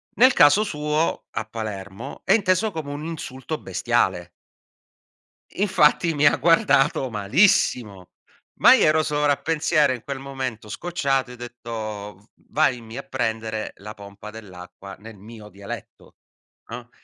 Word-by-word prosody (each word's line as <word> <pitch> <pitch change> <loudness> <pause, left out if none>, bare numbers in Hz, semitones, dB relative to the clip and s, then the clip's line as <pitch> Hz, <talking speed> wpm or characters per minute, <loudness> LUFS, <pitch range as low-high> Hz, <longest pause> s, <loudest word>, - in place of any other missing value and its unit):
nel 255 +2 +6
caso 145 +9 +5
suo 150 -4 -1
a 110 - -4
Palermo, 105 -2 -7
è - - +4
inteso 205 0 +2
come 155 -5 -6
un 145 +2 -6
insulto 155 -2 -6
bestiale. 95 -1 -1 1.3
Infatti 170 -4 +3
mi 145 -1 +1
ha 145 - +5
guardato 145 -5 +3
malissimo, 105 - +1 0.5
ma - - +8
io - - +4
ero 155 +1 +3
sovrappensiero 150 0 +1
in 125 -2 -4
quel 140 -1 -5
momento 130 -5 -6
scocciato 135 -5 -1
e - - -9
ho - - -10
detto: 110 -4 -8 0.2
"Vammi 125 -6 0
a 140 - -5
prendere 110 -4 -3
la 105 +2 -9
pompa 100 0 -11
dell'acqua". 95 -2 -11
Nel 110 -1 -12
mio 105 +1 -12
dialetto, 100 0 -10 0.5
no, 120 +1 -8
125 Hz, 130 wpm, -23 LUFS, 110-150 Hz, 1.3 s, ma